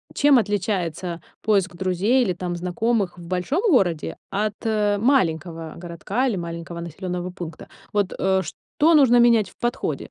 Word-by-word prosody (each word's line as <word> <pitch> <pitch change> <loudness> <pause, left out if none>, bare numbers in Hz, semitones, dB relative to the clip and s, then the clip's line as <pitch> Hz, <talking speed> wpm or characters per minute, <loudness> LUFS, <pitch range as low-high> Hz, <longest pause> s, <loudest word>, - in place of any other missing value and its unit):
чем 285 -2 +5
отличается 180 -5 -2 0.2
поиск 195 -4 +1
друзей 190 +8 +2
или 185 - 0
там 175 0 -4
знакомых 190 +2 -1
в 170 -1 -11
большом 185 - -1
городе 175 - +1
от, 210 +1 0
э, 210 -2 +1
маленького 165 - 0
городка 180 +9 -2
или 225 - 0
маленького 170 0 -6
населённого 180 +2 -5
пункта. 170 -3 -8 0.3
Вот, 205 -2 0
э, 190 0 +2
что 310 - 0
нужно 245 -4 +6
менять 235 -3 +4
в - - -23
подходе? 240 +1 -2
190 Hz, 150 wpm, -23 LUFS, 175-225 Hz, 0.3 s, нужно